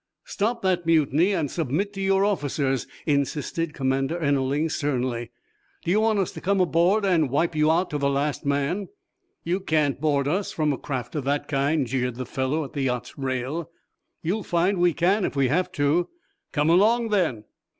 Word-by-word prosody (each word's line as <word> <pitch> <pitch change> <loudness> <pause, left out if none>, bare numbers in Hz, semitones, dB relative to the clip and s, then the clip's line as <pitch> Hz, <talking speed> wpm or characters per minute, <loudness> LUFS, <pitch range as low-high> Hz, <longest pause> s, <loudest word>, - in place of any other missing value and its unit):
"Stop 230 +3 -2
that 180 -3 0
mutiny 160 +3 +3
and 160 -8 -1
submit 170 +6 -1
to 195 - -5
your 195 0 +3
officers," 140 - -1 0.2
insisted 150 +2 -1
Commander 135 +3 0
Ennerling, 140 0 +1
sternly. 125 -6 -2 0.6
"Do 170 - +1
you 210 +3 +3
want 220 -1 +2
us 195 -3 0
to - - -9
come 200 +1 +1
aboard 180 +4 +3
and 165 -7 +2
wipe 165 +6 +1
you 155 0 +3
out 170 +3 +1
to 150 - -2
the 140 0 +1
last 140 +1 -1
man?" 145 +8 -1 0.6
"You 175 +3 0
can't 150 -7 0
board 145 -3 +1
us, 190 +7 -1
from 155 -2 0
a - - -4
craft 125 -4 -4
of 145 -4 -3
that 145 +1 0
kind," 140 0 +1
jeered 125 0 -2
the 130 +1 -5
fellow 135 +6 -1
at 140 - -9
the 140 - -2
yacht's 125 -2 -2
rail. 135 +5 -3 0.5
"You'll 190 +7 -1
find 180 +1 +1
we 175 -2 +3
can, 190 +4 +2
if - - -2
we 135 -2 +2
have 180 +6 +1
to." 150 +4 +1 0.4
"Come 150 +1 +2
along, 225 +6 +4
then!" 170 - +1
155 Hz, 185 wpm, -25 LUFS, 140-180 Hz, 0.6 s, along